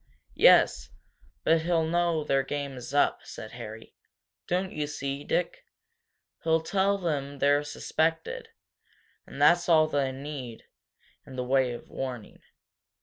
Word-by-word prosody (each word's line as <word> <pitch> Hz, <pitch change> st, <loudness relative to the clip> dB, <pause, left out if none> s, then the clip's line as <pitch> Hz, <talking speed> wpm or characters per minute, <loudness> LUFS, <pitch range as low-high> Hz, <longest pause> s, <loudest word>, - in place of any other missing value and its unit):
"Yes, -, -, +5 dB, 0.5 s
but 165 Hz, 0 st, +3 dB
he'll 165 Hz, -1 st, +1 dB
know 170 Hz, -1 st, +1 dB
their 135 Hz, -2 st, +2 dB
game 140 Hz, 0 st, -4 dB
is 125 Hz, -1 st, -8 dB
up," 145 Hz, -, +2 dB
said 110 Hz, -, -9 dB
Harry. 115 Hz, -2 st, -9 dB, 0.5 s
"Don't 185 Hz, +1 st, -1 dB
you 150 Hz, -1 st, -2 dB
see, 140 Hz, -1 st, -4 dB
Dick? 175 Hz, +3 st, -2 dB, 0.8 s
He'll 160 Hz, 0 st, +2 dB
tell 200 Hz, +3 st, +1 dB
them 145 Hz, -6 st, -3 dB
they're 145 Hz, +1 st, +3 dB
suspected 165 Hz, -, -2 dB, 0.8 s
and -, -, -10 dB
that's 175 Hz, 0 st, +4 dB
all 160 Hz, -2 st, +6 dB
they'll 140 Hz, -3 st, 0 dB
need 135 Hz, -4 st, -7 dB, 0.6 s
in 130 Hz, -, -10 dB
the 125 Hz, -, -2 dB
way 130 Hz, 0 st, +2 dB
of 120 Hz, -, -9 dB
warning. 125 Hz, -5 st, -6 dB
145 Hz, 135 wpm, -28 LUFS, 135-165 Hz, 0.8 s, all